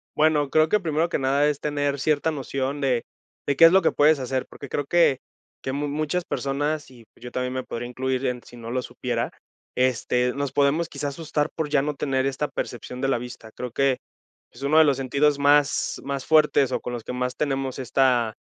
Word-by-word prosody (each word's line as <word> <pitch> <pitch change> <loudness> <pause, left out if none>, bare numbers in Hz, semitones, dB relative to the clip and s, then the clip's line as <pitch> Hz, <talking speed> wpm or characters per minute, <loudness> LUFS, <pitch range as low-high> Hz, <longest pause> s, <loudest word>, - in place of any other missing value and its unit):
Bueno, 150 -2 +3
creo 155 +2 +4
que, 210 - +3
primero 165 -2 0
que - - -1
nada, 140 +2 +2
es 145 -1 -1
tener 145 -1 -1
cierta 150 +2 +1
noción 135 -1 -3
de 130 -4 +1 0.4
de 140 - +1
qué 165 - +4
es 165 - +10
lo 190 - +5
que - - +2
puedes 150 0 +4
hacer, 130 0 -2
porque 140 - -10
creo 145 +2 -2
que 165 -5 +3 0.4
que 130 - -2
mu 145 +2 -2
muchas 155 +4 -2
personas 145 +2 -2
y, 120 -3 -16
pues, - - -20
yo 125 - -7
también 125 0 -2
me 130 0 -3
podría 120 0 -5
incluir 130 +1 -2
en 125 -1 -1
si 120 - -14
no 115 -1 -8
lo 130 - 0
supiera, - - -3 0.4
este, 125 0 +1
nos 140 -1 -3
podemos 145 +5 +2
quizá 145 - -4
asustar 150 0 -2
por 160 -2 -2
ya 140 - +3
no 150 0 -2
tener 135 -2 0
esta 135 +2 -1
percepción 125 +1 -5
de 135 - +1
la 135 - +2
vista, 120 -2 -9
creo 125 -2 -5
que 135 0 +2 0.6
es 120 - -11
uno 145 +3 +3
de 160 - +8
los 140 -2 +2
sentidos 140 +2 +1
más 145 0 +2
más 140 -1 -4
fuertes 150 -4 +4
o - - 0
con 125 - -5
los 120 -2 -5
que - - -5
más 125 0 -2
tenemos 135 -2 -2
esta 125 -3 +2
140 Hz, 220 wpm, -24 LUFS, 130-150 Hz, 0.6 s, es